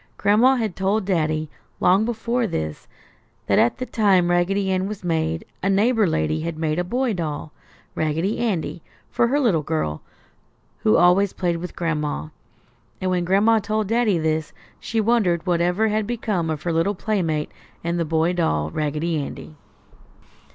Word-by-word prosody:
Gran'ma 230 +6 +4
had 220 -6 -2
told 195 +2 0
Daddy, 155 -4 0 0.3
long 190 +4 +4
before 235 +1 -1
this, 80 - -4 0.6
that - - +3
at 120 - +3
the 255 - -3
time 190 -7 +2
Raggedy 190 +3 +1
Ann 185 0 0
was 210 -2 -7
made, 160 -1 -1 0.2
a 195 - 0
neighbor 215 +2 +3
lady 115 - 0
had 165 0 -4
made 155 0 -1
a - - +1
boy 245 +5 -1
doll, 155 -4 -4 0.4
Raggedy 160 +7 -1
Andy, 185 -7 -2 0.3
for 235 - +2
her 280 +4 +1
little 215 - +2
girl, 145 - -2 0.8
who 105 - +3
always 185 +2 +4
played 175 -2 -1
with 180 +2 -7
Gran'ma. 150 - -2 0.7
And 185 0 -1
when 180 -1 0
Gran'ma 210 +5 +3
told 215 0 -1
Daddy 225 -5 +2
this 160 -1 -1 0.3
she 225 - -2
wondered 210 -7 +2
whatever 180 +4 +1
had 215 0 0
become 215 -8 -1
of 155 -2 -3
her 170 - -1
little 165 +5 +1
playmate 175 -7 -1 0.3
and 170 +1 -1
the - - +2
boy 160 +2 +1
doll, 80 - 0
Raggedy 155 +1 -1
Andy. 155 - -9
180 Hz, 160 wpm, -22 LUFS, 160-210 Hz, 0.8 s, Gran'ma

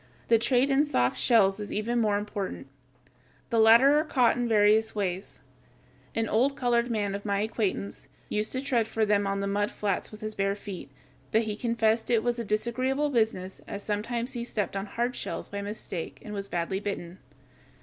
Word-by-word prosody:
The 230 -1 +6
trade 255 +3 +2
in 275 +2 +4
"soft 125 - +1
shells" 210 -5 +4
is 210 - -6
even 235 +3 0
more 210 -2 +2
important. 205 -7 -4 0.9
The 230 - +3
latter 235 +7 +7
are - - +1
caught 255 -7 +3
in 245 0 -1
various 215 +1 +4
ways. 190 -2 -3 0.7
An 225 0 0
old 255 +7 +2
colored 240 -2 +1
man 205 -3 -1
of 200 0 -4
my 200 -1 0
acquaintance 210 -2 -2 0.2
used 210 0 -2
to 260 - -1
tread 245 -5 +1
for 220 0 0
them 205 -1 +2
on 195 0 -1
the - - -1
mud 205 +1 0
flats 200 -3 -2
with 215 - -11
his 215 0 -4
bare 195 0 0
feet; 200 -6 -8 0.4
but 220 +1 +3
he 215 -1 -3
confessed 225 -1 +1
that 240 - +3
it 220 - +1
was 240 0 0
a - - -1
disagreeable 255 +7 0
business, 220 -6 -1
as 200 0 -6
sometimes 230 +4 -2
he 240 -2 -3
stepped 210 -4 -3
on 195 +1 -3
"hard 240 +4 -2
shells" - - -5
by 200 0 -4
mistake 200 -4 -6
and 210 - -6
was 200 -1 -4
badly 175 +1 -2
bitten. 190 -3 -5
215 Hz, 195 wpm, -28 LUFS, 200-235 Hz, 0.9 s, latter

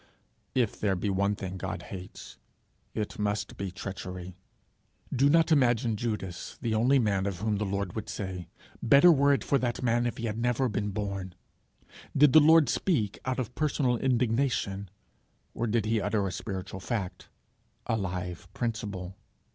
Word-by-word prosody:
If 120 -5 +1
there 100 -2 +1
be 100 +3 -1
one 100 +2 +1
thing 95 -1 -5
God 95 0 -4
hates, 95 -4 -9 0.6
it 105 -1 -3
must 105 0 -1
be 100 -1 -4
treachery. 90 -1 -7 0.8
Do 140 +3 +4
not 165 +2 +4
imagine 120 -5 +3
Judas 105 -5 -4
the 115 -3 -1
only 125 +6 +4
man 100 -5 +1
of 95 -3 -3
whom 105 +2 0
the 105 0 -1
Lord 100 -1 -2
would 110 - -5
say, 95 -4 -5 0.3
'Better 140 +9 +7
were 140 -2 +4
it 140 - +2
for 140 - +2
that 120 0 -2
man 120 0 +2
if 120 - -4
he 115 - -3
had 110 0 -3
never 120 +2 +1
been 105 -2 -2
born!' 100 -3 -4 0.8
Did 140 -1 +6
the 155 - +10
Lord 160 -1 +6
speak 115 - 0
out 130 0 -1
of 125 -2 -3
personal 140 -5 +1
indignation, 120 -5 0 0.6
or 120 - -2
did 110 -1 +1
he 110 0 +1
utter 100 0 0
a - - -3
spiritual 95 -2 -5
fact, 95 -4 -4 0.6
a - - 0
live 90 -4 -4
principle? 105 -6 -3
110 Hz, 165 wpm, -29 LUFS, 95-125 Hz, 0.8 s, the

